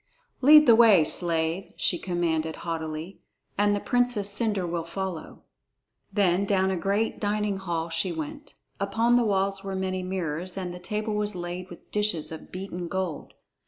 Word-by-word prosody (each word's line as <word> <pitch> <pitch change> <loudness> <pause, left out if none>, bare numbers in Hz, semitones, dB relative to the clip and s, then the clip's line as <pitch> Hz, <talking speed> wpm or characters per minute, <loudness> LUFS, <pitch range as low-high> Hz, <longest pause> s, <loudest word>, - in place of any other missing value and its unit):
"Lead 300 +3 +8
the 235 - +7
way, 220 -7 +7
slave," 165 +2 +1
she 175 - +2
commanded 165 -3 -1
haughtily, 160 +1 -4 0.4
"and 205 0 +2
the - - -1
Princess 245 -3 +1
Cendre 210 -3 0
will 170 -1 -2
follow." 175 0 -6 0.7
Then 195 -2 +2
down 190 -1 +2
to - - 0
a - - -2
great 200 +5 0
dining 210 -1 -1
hall 170 -3 -3
she 165 +2 -1
went. 165 - -7 0.2
Upon 225 +5 +2
the 245 - +4
walls 195 -2 0
were 195 -1 -4
many 185 0 -2
mirrors, 180 -1 -3
and 180 -2 -4
the 180 - -8
table 210 +4 -3
was 210 -1 -1
laid 175 +1 -5
with 175 - -14
dishes 210 -8 0
of 160 - -9
beaten 180 -2 -5
gold. 185 -4 -4
190 Hz, 165 wpm, -26 LUFS, 170-205 Hz, 0.7 s, Lead